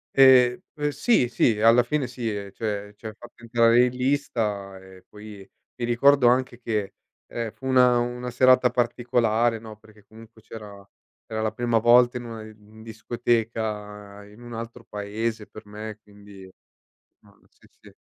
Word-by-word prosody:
Ehm, 130 -1 +6
p 150 -1 -3
sì, 145 - +2
sì, 115 -2 +1
alla 115 +2 +5
fine 135 +2 -2
sì. 125 -1 -9 0.3
Cioè, 105 -2 -5
ci - - -20
ha 110 - -5
fatto 120 +2 -16
entrare 115 +1 +4
in 125 - -2
lista 115 -7 -2
e 95 -1 -16
poi 105 -2 -12 0.3
mi 120 - -4
ricordo 125 +2 +4
anche 125 0 +1
che, 105 -4 -3 0.3
ehm, 115 -2 -5
fu 130 - -9
una 125 -2 +4
una 125 +1 -4
serata 130 -1 +4
particolare, 120 -2 0
no, 110 -1 -11
perché 105 -1 -21
comunque 110 +1 -17
c'era 105 -3 -11 0.5
era 110 0 -2
la 110 - -1
prima 120 +1 0
volta 120 +2 +4
in 120 - -7
una 115 -1 -8
di 110 0 -15
discoteca 110 -3 -4
in 105 +3 -17
un 120 0 -10
altro 115 +1 -8
paese 105 +1 -4
per 110 - -13
me, 105 +1 -8
quindi 100 -2 -15 0.7
mh, - - -25
sì, - - -25
sì. - - -17
115 Hz, 160 wpm, -24 LUFS, 105-120 Hz, 0.7 s, Ehm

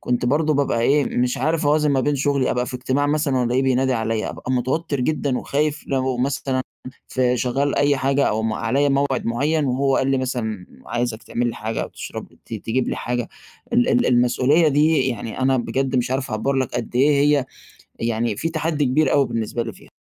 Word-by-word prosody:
كنت 125 0 -1
برضه 150 +3 +2
بابقى 135 -4 +1
إيه، 140 +4 +3
مش 125 0 +1
عارف 160 -1 0
أوازن 150 0 +3
ما 135 - +2
بين 145 +2 +1
شُغلي، 140 -1 +1
أبقى 125 0 -1
في - - -6
إجتماع 130 +3 0
مثلًا 145 -2 +1
وألاقيه 125 +2 +1
بينادي 130 0 +2
عليَّ 115 -1 -1
،أبقى 130 - -5
متوتَّر 135 +4 -1
جدًا 140 -1 0
وخايف 150 +1 -1
لو 130 -2 0
مثلًا 130 0 -1 0.5
في 125 -1 +1
شغّال 135 +4 0
أي 145 -1 +3
حاجة 135 +1 +1
أو 110 +1 -1
م 110 -1 0
عليَّ 130 +6 +1
موعِد 135 -3 0
مُعيّن، 145 +6 +1
وهو 135 +1 +1
قال 135 +1 +1
لي 135 - +2
مثلًا 110 -7 -3 0.2
عايزك 120 -2 -2
تعمل 120 +1 -2
لي - - -4
حاجة 110 +1 -3
أو - - -5
تشرب - - -8 0.2
ت 115 - -6
تجيب 115 +4 -2
لي - - -2
حاجة، 120 -1 -3 0.4
ال 120 - +3
ال 120 - +3
المسؤولية 130 +6 +3
دي 150 0 +3
يعني 115 +1 -5
أنا 130 0 +3
بجَد 130 +2 -1
مش 125 0 0
عارف 130 +1 -2
أعبّر 110 +6 -1
لك 130 -1 -1
قد 120 0 -3
إيه 140 +4 +4 0.3
هي، 135 - -2 0.6
يعني 115 -2 -1
في 165 - -1
تحدّي 155 -2 -1
كبير 135 +3 +2
أوي 140 -2 +4
بالنسبة 115 +1 -2
لي 115 -2 -6
فيها. - - -17
130 Hz, 205 wpm, -21 LUFS, 120-140 Hz, 0.6 s, إيه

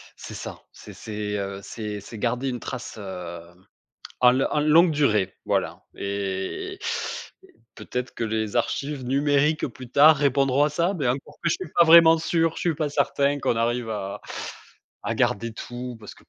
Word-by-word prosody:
C'est - - -9
ça, - - -7
c'est - - -12
c'est, 105 -1 -4
heu, 100 0 -4
c'est 105 -2 -5
c'est 110 +2 -10
garder 125 +5 -1
une 125 -1 -4
trace, 125 -3 -7
heu, 90 -4 -7 0.8
en 125 +1 +5
en 150 - +1
longue 160 +3 +5
durée, 105 -11 +1
voilà - - -1
et 100 -1 -4 0.6
et - - -21 0.2
peut-être 125 0 -5
que 115 - -2
les 110 0 -2
archives 140 +3 -1
numériques 145 +3 +2
plus 125 0 -11
tard 150 +2 +7
répondront 140 0 +3
à 150 - +2
ça, 170 +6 0
mais 140 -8 -1
encore 140 +3 -3
que 170 - +2
je - - +3
suis - - -7
pas 170 - +8
vraiment 165 0 +8
sûr, 165 0 +1
je 175 - -1
ne - - +3
suis - - -8
pas 155 -2 -1
certain 140 0 +1
qu'on 120 - 0
arrive 120 0 0
à 100 -2 -4 0.8
à - - -2
garder 115 +2 0
tout, 125 0 -7
parce 105 - -10
que - - -21
125 Hz, 180 wpm, -25 LUFS, 105-150 Hz, 0.8 s, pas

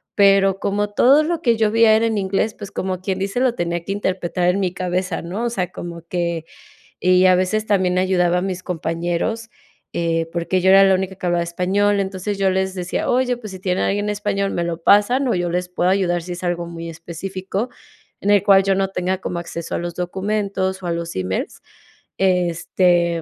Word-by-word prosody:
Pero 195 -1 +4
como 205 +1 -1
todo 265 +8 +5
lo 330 +1 -2
que 235 -5 +3
yo 220 -1 +1
vi 230 +1 +4
era 220 +1 +5
en 225 -2 0
inglés, 200 +2 0
pues 205 -4 -9
como 185 -1 -3
quien 190 0 -3
dice, 195 +5 -2
lo 255 -2 +2
tenía 170 -2 -2
que 195 - -2
interpretar 185 -3 -1
en 185 +2 +1
mi 185 -2 -1
cabeza, 180 -1 -2
¿no? 190 +8 -4
O - - +1
sea, 185 -6 -3
como 170 -1 -7
que 170 -2 -2 0.6
y 185 0 +4
a 185 -1 +6
veces 185 +4 0
también 185 -3 +1
ayudaba 180 -1 +2
a - - 0
mis 185 -1 -4
compañeros, 175 +7 -2 0.4
eh, 165 -1 -1
porque 175 +2 -1
yo 190 - +3
era 195 +1 +7
la 190 -1 +4
única 190 0 -3
que 185 - -7
hablaba 175 -1 +1
español. 195 +4 +1
Entonces, 195 +1 -3
yo 195 -1 +2
les 190 0 0
decía: 180 -1 -2
"Oye, 250 0 +2
pues 220 -4 -9
sí 190 - -8
tienen 185 0 -1
alguien 205 +1 0
español, 205 -1 -1
me 170 - -1
lo 170 -1 -3
pasan 225 +9 +4
o 240 - +1
yo 175 -1 -1
les 180 +1 -1
puedo 180 0 0
ayudar 185 -2 +1
sí 180 - -7
es 175 +1 -6
algo 175 -1 -1
muy 170 0 -7
específico 185 +6 -5 0.5
en 205 - -1
el 205 -1 +5
cual 195 0 +5
yo 195 0 +2
no 195 0 +1
tenga 185 0 -2
como 180 -2 -4
acceso 170 -1 -5
a - - -1
los 175 0 -5
documentos 190 +1 -2
o 180 - -5
a - - -1
los 170 0 -4
emails", 95 0 -3 0.6
este, 175 -1 +2
185 Hz, 210 wpm, -20 LUFS, 175-200 Hz, 0.6 s, era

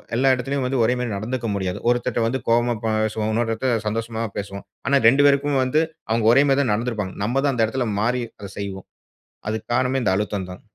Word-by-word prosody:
எல்லா 130 +3 +2
எடத்துலையும் 135 +2 -2
வந்து 130 0 0
ஒரே 115 - +3
மாரி 125 - -2
நடந்துக்க 115 +4 -3
முடியாது. 95 -2 -2
ஒருத்தர்ட்ட 120 0 0
வந்து 130 +3 -1
கோவமா 120 +1 +3
பேசுவோம். 110 0 0
இன்னொருத்தர் 115 0 0
கிட்ட 120 -3 0
சந்தோஷமா 115 +1 -3 0.2
பேசுவோம். 100 0 -5 0.2
ஆனா 140 0 +4
2 135 +5 +5
பேருக்குமே 140 0 +2
வந்து 130 +5 +2 0.3
அவுங்க 110 0 +1
ஒரே 135 +3 +6
மாரி 135 - +3
தான் 125 - +1
நடந்துருப்பாங்க. 110 -4 -2
நம்ம 125 +5 +1
தான் 140 - +2
அந்த 115 -2 +3
எடத்ல 120 +1 -2
மாறி 125 +3 +1 0.2
அத 100 - -7
செய்வோம். 100 -2 -6 0.6
அதுக்கு 110 0 -4
காரணமே 130 +1 +1
இந்த 95 - +2
அழுத்தம் 105 -2 -2
தான். 90 - -10
115 Hz, 200 wpm, -22 LUFS, 110-130 Hz, 0.6 s, ஒரே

